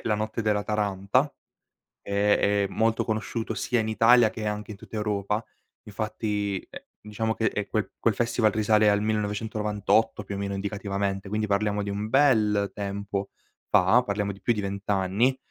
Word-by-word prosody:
la 105 -2 0
notte 110 +1 -3
della 105 -1 +1
Taranta, 105 +6 0 0.7
ehm, 100 +1 +2
è 100 0 +2
molto 115 0 +1
conosciuto 110 0 -2
sia 120 +4 0
in 110 - -1
Italia 115 +1 +5
che 110 -1 -6
anche 105 +1 -3
in 100 - -9
tutta 110 - -8
Europa. 105 0 -1 0.4
Infatti, 105 -1 -2
ehm, - - -9 0.2
diciamo 110 +1 -2
che, 115 - -2
ehm, 105 -2 -1
quel 110 -1 -1
quel 115 - +2
festival 115 -1 +1
risale 110 0 +3
al 100 0 +2
1998 105 0 0
più 100 0 -6
o - - -4
meno 100 0 -3
indicativamente, 100 -1 -3
quindi 105 0 -1
parliamo 105 +1 0
di 100 - -4
un 105 +2 -3
bel 105 -8 +3
tempo 100 -1 -4 0.4
fa, 110 +8 +5
parliamo 100 -2 -2
di 100 - -16
più 120 - +1
di 105 - -4
20 100 +1 -5
anni. 100 +7 +2
105 Hz, 170 wpm, -26 LUFS, 100-110 Hz, 0.7 s, Italia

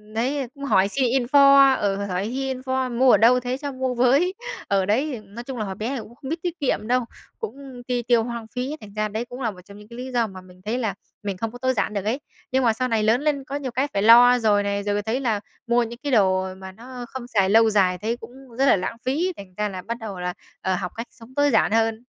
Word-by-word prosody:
đấy, 260 +3 -1
cũng 280 - -10
hỏi 195 -7 +3
xin 265 +6 -1
info, 275 +2 +6
ừ, 200 -1 +1
hỏi 195 -1 -2
hy 265 +3 -2
info: 260 -1 -2
"Mua 260 0 +6
ở - - +7
đâu 240 +4 +5
thế, 250 +1 -3
cho 285 0 -5
mua 260 -1 -2
với" 270 +10 +3 0.3
Ờ, 195 -1 +2
đấy, 260 +7 0
ừm, 210 -1 -13
nói 235 - -6
chung 260 0 -6
là 215 - -2
hồi 190 - -5
bé 215 +5 -3
thì 255 - -3
cũng 235 +3 -14
không 265 - -9
biết 325 +2 -3
tiết 355 -1 -3
kiệm 230 -6 -1
đâu, 250 -1 +2 0.3
cũng 275 - -8
ti 245 -1 0
tiêu 235 -1 +3
hoang 235 -1 -5
phí, 255 +4 -2
thành 205 -1 -12
ra 215 0 -1
đấy 220 +3 -4
cũng 245 +2 -9
là 225 -4 0
một 180 - -14
trong 200 0 -13
những 210 0 -14
cái 235 +1 -11
lý 255 +1 -6
do 240 -2 +1
mà 190 -2 -10
mình 185 0 -18
thấy 225 +3 -1
là 225 -6 -1 0.3
mình 200 -2 -3
không 225 +3 -3
có 245 - -9
tối 260 +1 0
giản 215 - -1
được 200 -1 -3
ấy. 235 +6 0 0.3
Nhưng 260 0 +2
mà 230 - +4
sau 255 +3 -1
này 225 -3 +1
lớn 225 +4 +3
lên 290 -2 0
có 275 - -6
nhiều 275 -3 -3
cái 265 +4 0
phải 200 - +1
lo 245 +2 +8
rồi 210 -3 +3
này, 200 0 -1
rồi 205 0 0
thấy 225 +5 -1
là 225 -6 0 0.3
mua 240 0 +3
những 235 +1 -7
cái 290 - -2
đồ 190 -4 +2
mà 190 0 -9
nó 245 +4 -9
không 260 -2 -7
xài 200 -6 +2
lâu 225 +2 +6
dài 190 -4 +2
thấy 225 +5 -2
cũng 235 0 -11 0.3
rất 270 - +3
là - - +6
lãng 195 +4 -3
phí, 325 +9 0
thành 190 -2 -11
ra 210 0 0
là 185 -2 -6
bắt 230 +5 -5
đầu 205 -5 -6
là, 180 0 -2 0.3
ờ, 190 0 0
học - - -4
cách 230 +2 -5
sống 235 +2 -16
tối 290 0 +3
giản 220 - +3
hơn. 225 +1 +1
235 Hz, 280 wpm, -23 LUFS, 205-260 Hz, 0.3 s, lo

